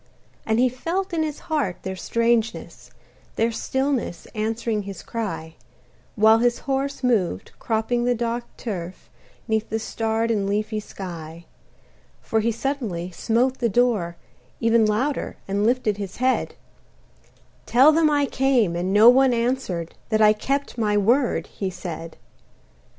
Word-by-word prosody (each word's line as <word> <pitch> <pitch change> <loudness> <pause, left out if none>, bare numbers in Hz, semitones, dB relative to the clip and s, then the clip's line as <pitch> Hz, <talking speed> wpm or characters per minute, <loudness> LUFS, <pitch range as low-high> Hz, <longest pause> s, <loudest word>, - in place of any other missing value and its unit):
And 220 0 +2
he 250 +2 +4
felt 340 +10 -3
in 325 - +1
his 305 -2 -3
heart 290 - -1
their 190 0 -4
strangeness, 230 +2 -1 0.5
Their 230 +1 +1
stillness 265 -5 -2
answering 220 0 -1
his 195 -1 -8
cry, 205 -8 -4 0.6
While 220 +1 +6
his 240 0 +2
horse 275 0 -2
moved, 200 - 0
cropping 230 +2 0
the 245 0 +2
dark 235 +1 -2
turf, 185 -6 -6 0.4
'Neath 220 -1 0
the 220 - -1
starred 225 +1 -1
and 200 -3 0
leafy 215 +1 -1
sky; 170 -5 -8 0.7
For 225 - -1
he 230 +2 +1
suddenly 225 -8 -3
smote 245 +8 0
the 235 - +1
door, 210 -7 +1 0.4
even 230 -1 +3
Louder, 255 +7 -1
and 200 +2 +1
lifted 235 -4 +1
his 200 -2 -6
head: 255 +1 0 1.1
"Tell 265 +6 +6
them 315 0 +3
I 290 -1 +2
came, 260 -10 +2
and 180 +2 -1
no 210 +3 +7
one 255 0 +6
answered, 230 -9 -2 0.2
That 215 -1 +2
I 215 -1 +6
kept 275 +4 -2
my 210 -2 +2
word," 240 +6 +2
he 195 - -4
said. 165 -3 -7
225 Hz, 140 wpm, -23 LUFS, 205-255 Hz, 1.1 s, no